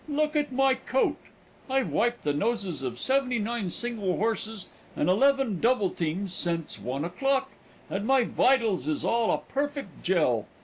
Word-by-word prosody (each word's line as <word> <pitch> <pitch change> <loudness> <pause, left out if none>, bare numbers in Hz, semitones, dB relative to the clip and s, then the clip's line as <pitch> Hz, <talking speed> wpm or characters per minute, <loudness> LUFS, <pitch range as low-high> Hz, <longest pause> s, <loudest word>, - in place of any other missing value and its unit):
Look 300 +1 0
at 295 -2 +1
my 270 +1 +3
coat! 260 0 0 0.5
I've 265 -1 +1
wiped 240 +1 0
the 145 - +1
noses 200 - -1
of 125 -2 -4
seventy 260 - +1
nine 220 -2 -2
single 210 -3 -2
horses 220 -1 -2 0.3
and - - 0
eleven 265 0 +3
double 230 -5 +2
teams 175 +3 -2
sence 170 -3 -2
one 135 +5 -3
o'clock, 270 +9 0 0.4
and 205 +3 -3
my 270 -2 +4
vitals 225 - +2
is 155 -1 -1
all 230 -1 +2
a - - +3 0.2
perfect 280 - -3
jell. 150 - +1
225 Hz, 160 wpm, -27 LUFS, 180-265 Hz, 0.5 s, my